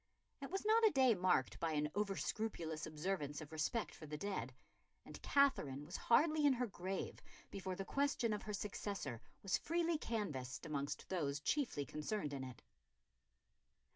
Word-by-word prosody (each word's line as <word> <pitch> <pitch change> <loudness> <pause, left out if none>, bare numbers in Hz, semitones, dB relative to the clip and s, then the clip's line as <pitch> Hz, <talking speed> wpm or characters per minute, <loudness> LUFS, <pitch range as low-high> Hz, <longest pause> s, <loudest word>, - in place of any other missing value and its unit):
It 275 - -4
was 385 +3 -2
not 445 +2 +5
a 440 - +9
day 260 - +5
marked 180 -8 +2
by 165 -1 0
an 150 0 +1
over 200 -1 0
scrupulous 165 -8 -2
observance 155 -2 -2
of 155 -1 -8
respect 160 +9 -1
for 155 - -10
the 150 +1 -4
dead, 185 - -2 0.5
and - - -9
Katherine 150 - +3
was 175 +4 -7
hardly 305 +5 +4
in 285 -2 +7
her 250 0 0
grave 190 -2 -4 0.3
before 190 -1 -3
the 195 +1 -4
question 275 -4 +1
of 210 - -2
her 210 - -5
successor 195 - -3 0.2
was 195 - +2
freely 335 -1 +1
canvassed 150 - -3
amongst 145 -2 -3
those 145 -6 0
chiefly 195 - 0
concerned 150 +1 -2
in 135 -1 -3
it. 130 -2 -8
190 Hz, 165 wpm, -39 LUFS, 150-235 Hz, 0.5 s, a